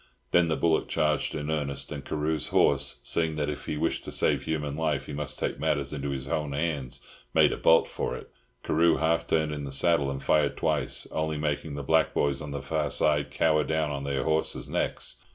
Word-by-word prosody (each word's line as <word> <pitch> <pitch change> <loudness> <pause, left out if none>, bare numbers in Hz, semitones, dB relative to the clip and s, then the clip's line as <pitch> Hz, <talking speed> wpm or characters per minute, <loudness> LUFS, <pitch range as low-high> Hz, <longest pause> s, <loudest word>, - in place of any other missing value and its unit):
Then 85 -1 +4
the 80 - +1
bullock 80 +3 +1
charged 75 -1 0
in 75 0 -3
earnest; 70 -3 -3
and 70 -2 -5
Carew's 75 -2 -1
horse, - - +2
seeing 80 +4 0
that 75 -1 -1
if 75 - -8
he 75 - -2
wished - - -1
to - - -6
save - - +1
human 75 -3 -2
life 75 -4 -1
he - - -7
must 75 0 -3
take - - -2
matters 75 -3 0
into 70 -1 -3
his 70 -1 -3
own 75 0 -2
hands, 70 -5 -2 0.3
made - - +6
a - - -1
bolt 80 - +5
for - - -3
it. - - -10 0.3
Carew 85 +1 +3
half 80 +1 +1
turned 80 -1 +1
in 75 -1 -4
the 70 - -5
saddle, 70 0 +2
and 70 0 -5
fired 75 -2 +2
twice, - - +1
only 80 -1 -1
making 75 0 -2
the 70 - -5
black 80 +3 +2
boys 70 -2 +1
on 75 - -6
the 70 -1 -5
far 75 -2 -1
side 75 0 +2
cower 75 -1 +2
down 80 -1 0
on 70 -1 -4
their 70 -1 -1
horses' 80 0 0
necks. - - -2
75 Hz, 215 wpm, -27 LUFS, 70-80 Hz, 0.3 s, made